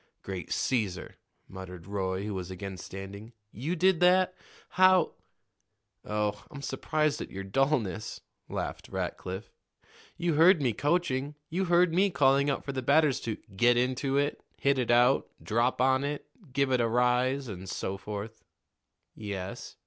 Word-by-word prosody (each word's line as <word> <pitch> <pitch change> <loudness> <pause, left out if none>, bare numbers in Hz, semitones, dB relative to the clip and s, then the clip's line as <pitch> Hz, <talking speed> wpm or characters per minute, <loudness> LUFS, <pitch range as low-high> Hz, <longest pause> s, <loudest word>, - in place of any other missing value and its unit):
"Great 95 -4 -6
Caesar!" 105 -8 -1 0.3
muttered 90 -3 -9
Roy, 95 -1 -2
who 105 0 -3
was 95 -1 -5
again 95 +1 -6
standing. 95 +4 -9 0.2
"You 145 - -3
did 185 0 +3
that? 185 +1 +4 0.4
How 185 -2 +4 0.5
" - - -50
"Oh, 105 -1 -1
I'm 140 -1 -9
surprised 150 +3 0
at - - -6
your 95 0 -6
dullness," 110 -2 0 0.3
laughed - - -4
Rackliff. 95 +4 -4 0.7
"You 170 -1 0
heard 165 +4 +6
me 125 -5 +1
coaching. 145 0 0 0.2
You 185 +3 0
heard 175 -1 +4
me 195 +3 +4
calling 140 -4 +3
out 140 - -2
for 140 - -3
the 130 -1 -3
batters 140 +1 +3
to 110 -2 -3 0.2
'get 120 +4 +4
into 130 +2 0
it,' 145 +1 0 0.2
'hit 140 -1 +2
it 125 - -1
out,' 120 +3 +4
'drop 120 +3 +1
on 130 +1 +3
it,' 145 +1 -3 0.3
'give 140 0 +1
it 125 -1 +3
a 115 - +2
rise,' 125 +3 +2
and 95 -3 -7
so 95 - -3
forth." 105 +3 -7 0.7
"Yes." 100 -3 -6
125 Hz, 155 wpm, -29 LUFS, 100-145 Hz, 0.7 s, heard